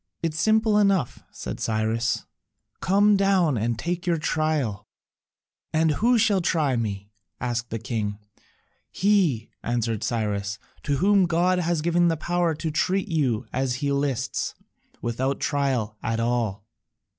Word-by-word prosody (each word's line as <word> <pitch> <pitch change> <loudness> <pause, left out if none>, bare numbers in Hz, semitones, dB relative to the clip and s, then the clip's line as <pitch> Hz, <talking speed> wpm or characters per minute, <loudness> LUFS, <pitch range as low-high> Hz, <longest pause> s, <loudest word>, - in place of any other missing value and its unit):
"It 165 -2 0
is 160 - -4
simple 220 +1 +3
enough," 195 - +2
said - - -6
Cyrus, 110 +1 0 0.5
"come 205 +2 +4
down 195 -7 +3
and 115 +1 -1
take 175 +7 -3
your 170 -1 +2
trial." 150 -10 -1 0.9
"And 160 0 +3
who 235 +10 +3
shall 210 -4 +3
try 155 -6 +1
me?" 100 -3 -3 0.3
asked 120 -1 -2
the 115 - -3
king. 105 -2 -3 0.7
"He," 185 - +1
answered 115 -2 -1
Cyrus, 105 -3 -1 0.2
"to 145 -2 -1
whom 195 +3 +4
God 175 +2 +2
has 170 -2 0
given 170 +1 +3
the 165 -1 +1
power 175 0 0
to 160 +1 -3
treat 185 +6 0
you 130 -8 0
as 130 -1 0
he 140 +2 -1
lists, 140 -3 -1 0.5
without 130 +4 -1
a - - -19
trial 130 -7 0
at 115 0 -1
all." 115 -4 -1
145 Hz, 145 wpm, -25 LUFS, 115-175 Hz, 0.9 s, come